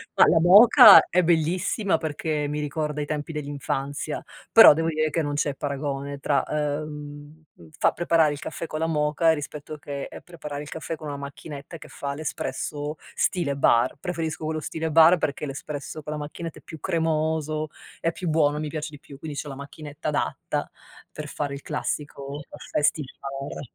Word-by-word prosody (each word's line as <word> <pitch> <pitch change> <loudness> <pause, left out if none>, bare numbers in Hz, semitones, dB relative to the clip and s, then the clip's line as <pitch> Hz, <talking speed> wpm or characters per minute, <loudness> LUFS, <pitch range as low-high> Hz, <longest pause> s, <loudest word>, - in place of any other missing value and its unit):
ma - - +7
la 165 - +5
moka 205 +4 +9
è 180 0 +3
bellissima 175 +4 +1
perché 150 -1 -2
mi 150 +1 -3
ricorda 150 0 -2
i - - -2
tempi 150 +1 -4
dell'infanzia, 145 0 -3 0.3
però, 225 -9 +10
devo 165 +2 -1
dire 155 0 0
che 165 - 0
non 145 -1 -2
c'è 145 -1 0
paragone 140 0 -4
tra, 140 0 +1
ehm, 150 0 -5 0.3
far - - +3
preparare 165 -3 +3
il 145 - -7
caffè 165 +2 -5
con 155 - -4
la 160 - 0
moka 155 +1 +2
rispetto 150 0 -6
che 140 -1 -6
e - - -10
preparare 150 -5 -7
il 150 - -10
caffè 160 +1 -5
con 155 -1 -9
una 140 -1 -4
macchinetta 140 +2 -8
che - - -12
fa 140 0 -5
l'espresso 145 0 -4 0.2
stile 155 -7 0
bar. 125 +1 +3
Preferisco 160 -3 -3
quello 155 0 -2
stile 160 +2 -3
bar 165 +3 +7
perché 150 -1 -2
l'espresso 145 +2 -6
con 150 - -5
la 150 - -4
macchinetta 155 +2 -7
è - - -21
più 160 -2 -10
cremoso, 155 -1 0 0.3
è 165 - 0
più 175 -3 -4
buono, 150 -2 +2
mi 155 -1 -3
piace 155 -1 -4
di 145 - -11
più. 140 -1 -13
Quindi, 150 -3 -6
c'ho 145 - -4
la 135 - -6
macchinetta 145 +2 -8
adatta 150 - -2 0.4
per 155 -1 -7
fare 145 -1 -4
il 140 - -8
classico 145 -1 -4 0.3
Festi 150 +1 +2 0.2
Bar. 135 0 -6
150 Hz, 180 wpm, -25 LUFS, 145-160 Hz, 0.4 s, però